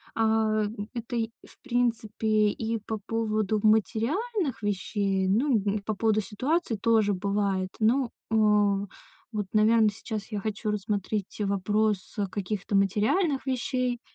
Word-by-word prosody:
А, 220 -1 +2 0.3
это, 240 0 -5
и, 225 -1 0 0.2
в - - -20
принципе, 225 -4 +1
и 225 +2 -2
по 215 +1 -5
поводу 215 -2 0
материальных 255 - +1
вещей. 195 -1 0
Ну, 240 +8 +2
м, 205 0 0
по 215 +1 -2
поводу 215 +1 +2
ситуации 255 - -1
тоже 215 -1 +2
бывает. 195 -1 0
Ну, 240 +3 +3 0.2
а, 210 -2 +3 0.5
вот, 210 -3 -3
наверно, 215 0 +5
сейчас 215 0 -6
я 210 - -2
хочу 215 +1 -3
рассмотреть 205 -1 -2
вопрос 205 +1 0 0.2
каких-то 200 0 -3
материальных 220 - +2
вещей, 255 -1 -1
215 Hz, 125 wpm, -27 LUFS, 205-230 Hz, 0.5 s, наверно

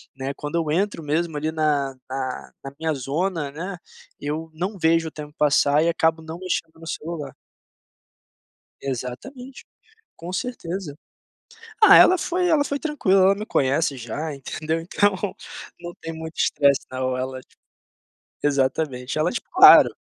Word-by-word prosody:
né. 135 +1 -4
Quando 150 +2 -5
eu 160 -3 0
entro 195 +1 0
mesmo 160 +2 -1
ali, 155 +2 -2
na 145 -4 0
na 130 -1 -5
na 135 0 -8
minha 160 -1 0
zona, 150 +3 -2
né, 180 +5 -6 0.4
eu 155 +3 -4
não 185 +5 -4
vejo 165 -1 +2
o - - -6
tempo 150 -1 -9
passar 145 0 +3
e 170 - +2
acabo 160 -1 +1
não 160 +1 -8
mexendo 165 -3 -3
no 165 - -11
celular. 155 -5 -5 1.5
Exatamente, 140 - -6 0.5
com 175 +2 -8
certeza. 185 - -4 0.9
Ah, 405 -1 +10
ela 370 - +7
foi 360 +1 0
ela 315 -4 +3
foi 285 0 -3
tranquila. 210 -12 +2
Ela 195 +1 +5
me 210 +1 -6
conhece 145 -3 +1
já, 135 +7 -5
entendeu. 155 +4 -3
Então, 190 +4 +1 0.6
não 175 0 -8
tem 165 0 -5
muito 160 0 -8
estresse 140 -2 +3
não, 130 0 -2
ela, 130 0 -4
ti - - -29 0.9
exatamente. 135 -1 0
Ela, 170 +3 +1
tipo, - - -6
claro 385 +1 +8
160 Hz, 150 wpm, -23 LUFS, 140-185 Hz, 1.5 s, Ah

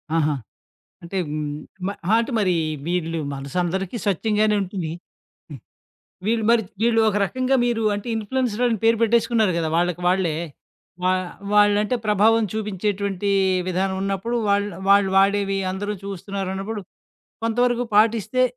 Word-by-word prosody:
ఆహా! 155 -2 +2 0.7
అంటే 180 +3 -4 0.7
మ - - 0 0.2
ఆహా! 215 - +3
అంటే 240 +2 -3
మరి 190 -4 +2 0.3
వీళ్ళు 165 -2 -1 0.2
మనసు 140 +4 -7
అందరికీ 190 +5 -3
స్వచ్ఛంగానే 210 +2 +1
ఉంటుంది. 185 -4 -4 0.6
హ్మ్. 135 -6 -9 0.7
వీళ్ళు 225 +1 +1
మరి 235 -1 +3 0.2
వీళ్ళు 230 -1 +3
ఒక 205 - -1
రకంగా 255 +6 0
మీరు 235 -2 0
అంటే 205 +4 -6
ఇన్ఫ్లుయెన్సర్స్ 240 +1 -1
అని 230 -2 0
పేరు 225 0 +4
పెట్టేసుకున్నారు 230 -3 +3
కదా, 160 -2 -1
వాళ్ళకి 175 0 0
వాళ్ళే? 180 -4 +1 0.7
వా 185 - +3 0.4
వాళ్లంటే 210 +3 +4
ప్రభావం 215 +2 +4
చూపించేటువంటి 200 -2 -2 0.4
విధానం 190 +1 0
ఉన్నప్పుడు, 195 +5 -2
వాళ్లు 205 0 +1 0.2
వాళ్ళు 200 -1 +5
వాడేవి 195 0 +2
అందరూ 205 +2 -3
చూస్తున్నారన్నప్పుడు, 195 +2 -4 0.6
కొంతవరకు 245 +1 +1
పాటిస్తే 225 +3 +3
205 Hz, 125 wpm, -22 LUFS, 190-225 Hz, 0.7 s, వాళ్ళు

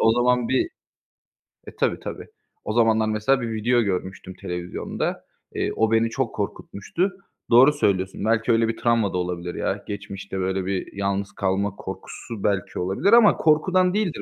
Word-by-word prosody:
o 115 - +5
zaman 125 0 +2
bir 130 - +1 1.0
E - - -10
tabii - - 0
tabii. - - -7 0.4
O 110 - -3
zamanlar 110 -1 +3
mesela 110 +5 +1
bir 115 -1 -3
video 120 +2 +2
görmüştüm 95 -2 -3
televizyonda. 90 0 -4 0.3
Eee, - - -1
o 110 0 +2
beni 115 0 +3
çok 130 0 -2
korkutmuştu. 105 - -3 0.4
Doğru 130 +5 +7
söylüyorsun. 95 -7 0
Belki, 110 +1 +2
öyle 115 0 +3
bir 115 - -2
travma 115 -4 +1
da - - 0
olabilir 90 -1 -3
ya. - - -2
Geçmişte 100 -1 -6
böyle 95 0 -1
bir 95 -1 -3
yalnız 100 0 -1
kalma 100 +1 -1
korkusu 95 +3 -8
belki 100 -3 -1
olabilir 95 - +1
ama 235 -3 +7
korkudan 180 +4 +3
değildir 205 -6 -1
110 Hz, 160 wpm, -23 LUFS, 95-120 Hz, 1.0 s, Doğru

